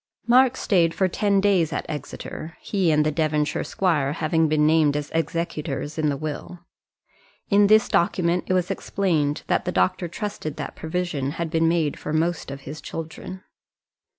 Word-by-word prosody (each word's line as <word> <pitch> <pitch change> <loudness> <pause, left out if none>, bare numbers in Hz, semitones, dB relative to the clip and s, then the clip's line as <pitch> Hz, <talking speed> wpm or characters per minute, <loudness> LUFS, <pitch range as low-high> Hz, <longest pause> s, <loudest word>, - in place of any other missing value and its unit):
Mark 255 +1 +5
stayed 170 -5 +2
for 190 - +2
ten 200 +2 +1
days 190 -5 +2
at - - -3
Exeter, 155 +2 -7
he 190 -5 0
and 150 -1 +3
the 155 - +2
Devonshire 150 -1 0
squire 150 -7 0
having 160 0 +1
been 150 0 +2
named 155 -2 +3
as 150 0 -5
executors 160 -3 -2
in 155 -1 +2
the 140 - -1
will. 155 +4 -5 0.9
In 200 0 +6
this 215 +1 +5
document 175 0 +1
it - - +1
was 180 -1 0
explained 155 -7 -1
that - - 0
the - - -1
doctor 90 - +1
trusted 170 -4 -5
that - - -6
provision 160 -4 -2
had 165 -1 -4
been 165 -1 +2
made 165 -4 0
for 150 - -4
most 165 +1 0
of 140 0 -7
his 150 +3 -8
children. 165 +4 -7
165 Hz, 170 wpm, -24 LUFS, 150-180 Hz, 0.9 s, In